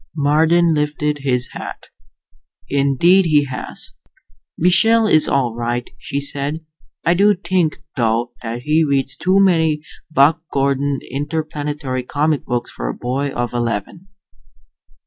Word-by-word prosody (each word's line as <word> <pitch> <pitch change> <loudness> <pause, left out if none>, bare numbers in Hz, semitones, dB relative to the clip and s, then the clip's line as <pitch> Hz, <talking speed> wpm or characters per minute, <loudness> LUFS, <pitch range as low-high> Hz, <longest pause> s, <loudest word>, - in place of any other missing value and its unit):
Marden 160 +3 +3
lifted 150 0 -1
his 125 -3 -1
hat. - - -8 0.8
"Indeed 140 +7 +3
he 150 -3 +3
has." 130 -2 -3 0.6
"Michael 220 +7 +4
is 155 -7 +4
all 130 -4 +1
right," 120 +1 -3
she 140 - -3
said. 145 +3 -2 0.4
"I 170 - +4
do 205 +3 +4
think, 170 -4 -1
though, 120 0 0
that 120 +1 -5
he 155 +3 +2
reads 135 -3 0
too 185 +7 +2
many 160 -5 +2 0.3
Buck 155 +1 +3
Gordon 140 0 0
Interplanetary 145 -2 -3
comic 150 +3 -1
books 120 -1 -3
for - - -5
a - - -4
boy 135 +3 -2
of 120 -3 -3
eleven." 120 - -3
145 Hz, 125 wpm, -19 LUFS, 130-160 Hz, 0.8 s, Michael